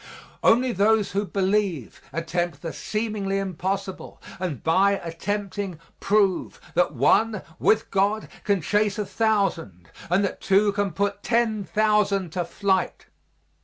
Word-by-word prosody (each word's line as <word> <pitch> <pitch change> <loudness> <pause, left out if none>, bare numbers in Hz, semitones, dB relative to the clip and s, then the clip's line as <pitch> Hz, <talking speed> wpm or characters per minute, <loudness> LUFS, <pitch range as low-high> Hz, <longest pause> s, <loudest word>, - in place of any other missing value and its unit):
Only 250 +2 +4
those 210 +1 +2
who 200 +1 -1
believe 195 - -1
attempt 165 -2 -3
the 165 - -4
seemingly 210 -3 -2
impossible, 190 -1 -4 0.2
and, 175 -9 -4
by 195 +5 +4
attempting, 195 +1 -4 0.2
prove 200 -3 +1
that 175 -4 +1
one, 210 - +3 0.2
with 220 - +2
God, 205 +2 +1 0.2
can 200 -3 +1
chase 210 +4 +1
a 210 - -1
thousand 195 - -1 0.2
and 185 +4 +3
that - - -5
two 200 +2 +3
can 200 -2 -1
put 200 +2 -1
ten 230 -3 +1
thousand 210 -3 +1
to 175 +2 -1
flight. 190 +1 -1
195 Hz, 130 wpm, -24 LUFS, 180-210 Hz, 0.2 s, Only